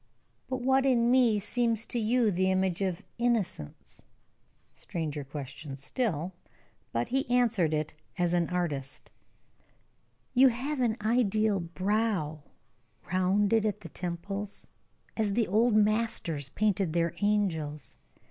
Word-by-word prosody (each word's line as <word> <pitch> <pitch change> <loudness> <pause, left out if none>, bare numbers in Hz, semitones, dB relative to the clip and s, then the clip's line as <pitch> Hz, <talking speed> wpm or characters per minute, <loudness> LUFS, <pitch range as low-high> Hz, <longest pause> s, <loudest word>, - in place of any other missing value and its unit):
"But 260 -1 -3
what 265 +1 +3
in 240 -3 +3
me 245 -4 +5
seems 230 +2 0
to 240 - -2
you 225 0 +2
the 185 +1 +1
image 190 -1 +1
of 185 -3 -1 0.2
'Innocence?'" 220 - -2 0.7
Stranger 155 -4 -4
question 140 0 -7
still. 175 - -2 0.6
But 115 +1 -1
he 270 0 0
answered 185 -12 +2 0.2
as 175 -1 +1
an 175 -2 +1
artist: 150 -7 -3 1.2
"You 265 +1 +7
have 260 +4 -1
an 235 -3 +1
ideal 215 -3 +2
brow, 185 -3 -1 0.7
rounded 200 +4 +3
at 210 -1 -1
the 165 - -9
temples 195 +5 -5 0.5
as 215 -3 0
the 225 0 +1
old 220 +4 +3
masters 210 - +1
painted 195 -2 0
their 170 -1 +1
angels. 160 - -1
200 Hz, 120 wpm, -29 LUFS, 170-230 Hz, 1.2 s, You